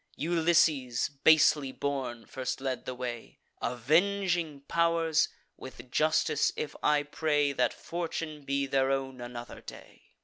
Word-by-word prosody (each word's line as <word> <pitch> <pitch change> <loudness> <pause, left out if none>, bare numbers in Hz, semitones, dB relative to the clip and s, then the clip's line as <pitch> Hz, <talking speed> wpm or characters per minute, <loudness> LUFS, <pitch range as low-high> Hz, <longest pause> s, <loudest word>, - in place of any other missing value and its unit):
Ulysses, 160 -6 +2
basely 150 -3 +5
born, 130 -5 -3
first 130 -1 -4
led 130 -1 -3
the 130 - -4
way. 120 -2 -6 0.2
Avenging 165 - +1
pow'rs! 165 +1 +2 0.3
with 125 -1 -11
justice 155 0 +2
if 150 - -4
I 150 0 +3
pray, 145 -1 0
That 125 -3 +1
fortune 165 -3 -5
be 140 0 0
their 135 -1 +1
own 135 -2 -2
another 120 0 -8
day! - - -13
145 Hz, 125 wpm, -29 LUFS, 130-160 Hz, 0.3 s, basely